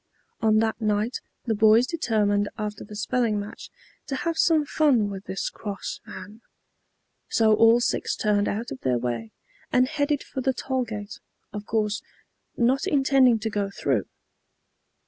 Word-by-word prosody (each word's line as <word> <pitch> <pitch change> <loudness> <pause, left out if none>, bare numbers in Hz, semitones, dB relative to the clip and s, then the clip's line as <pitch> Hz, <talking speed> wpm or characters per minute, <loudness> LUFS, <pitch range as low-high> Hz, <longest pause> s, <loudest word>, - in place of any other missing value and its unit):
On 220 -1 +3
that 220 +1 0
night 215 +3 0 0.3
the 230 - +1
boys 220 +3 +5
determined 210 -9 0
after 210 -1 -4
the 210 - -10
spelling 220 0 0
match 205 +1 -8 0.4
to 275 - -2
have 330 +5 -2
some 320 -2 +3
fun 260 -9 +2
with 195 0 -7
this 190 - -3
cross 205 -2 -6
man. 215 +3 -10 0.9
So 220 -1 +4
all 225 +2 +6
six 240 - -1
turned 205 -1 +1
out 225 +4 -3
of 130 - -6
their 125 -2 +1
way, 120 -2 -3 0.4
and 255 0 +4
headed 290 0 0
for 265 - -5
the 265 +1 +1
toll 260 -1 -1
gate, 210 -2 -7 0.3
of 210 0 -6
course, 215 -1 0 0.6
not 255 +3 +2
intending 270 -4 +4
to 220 - -2
go 205 -1 -1
through. 135 - -1
220 Hz, 155 wpm, -25 LUFS, 205-255 Hz, 0.9 s, all